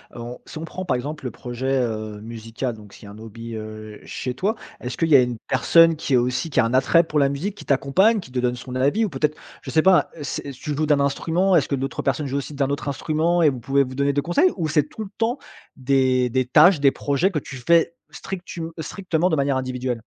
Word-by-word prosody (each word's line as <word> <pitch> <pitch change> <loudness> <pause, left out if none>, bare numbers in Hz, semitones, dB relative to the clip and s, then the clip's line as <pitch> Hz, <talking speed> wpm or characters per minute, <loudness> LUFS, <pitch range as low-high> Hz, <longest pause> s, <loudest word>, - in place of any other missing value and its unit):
heu, - - -8
on 120 +1 -7
si - - -10
on 160 - -5
prend, 185 +3 -6
par 145 - +1
exemple, 145 +3 -5
le 125 - -3
projet, 130 +2 -2
heu, 110 -3 -3
musical, 115 +2 -5
donc 105 -2 -15
ce - - -14
qui - - -13
est - - -10
un 100 +1 -11
hobby, 115 +1 -8
heu, 110 -1 -8
chez 125 -1 -5
toi, 200 - 0 0.3
est-ce 125 - -5
qu'il 165 - +1
y 150 - +6
a 135 - +8
une 125 -1 -2
personne 165 -1 +5
qui 150 -2 -3
est - - +6
aussi 125 +7 0
qui 145 - 0
a - - +4
un 115 - -2
attrait 135 +6 +4
pour 155 -2 -3
la 140 -1 +4
musique, 170 +9 -3
qui - - -12
t'accompagne, 185 +11 +3
qui 175 - -11
te 125 - -2
donne 125 0 0
son 125 +1 -8
avis 140 +12 +2
ou - - -3
peut-être, 150 0 -1 0.3
je - - -6
sais 160 - +4
pas, 185 +1 +4
heu, - - -11
c'est 140 0 -4
tu 145 +3 -5
joues 155 +2 0
d'un 150 -1 +3
instrument, 165 +7 +1
est-ce 160 - +3
que 140 - +1
d'autres 135 +1 -3
personnes 140 +2 -1
jouent 135 +1 -2
aussi 140 +1 -5
d'un 140 -1 0
autre 140 +1 -3
instrument 160 +5 0
et 155 - +6
vous 130 -3 -4
pouvez 135 +4 +2
vous 130 -1 -8
donner 140 +1 +1
des 145 - +1
conseils 175 - +2
ou 165 -4 -1
c'est 150 -1 +2
tout 185 +9 -8
le 200 - -9
temps 230 +3 0 0.4
des 130 -1 +2
des 130 +2 0
tâches, 155 +7 +6
des 140 -1 +4
projets 145 +9 0
que 155 - -1
tu 135 - -10
fais 170 +6 +2 0.2
strictum 175 -3 -6
strictement 175 0 -1
de 160 - +1
manière 140 -2 +1
individuelle? 125 -2 -3
140 Hz, 260 wpm, -22 LUFS, 125-160 Hz, 0.4 s, a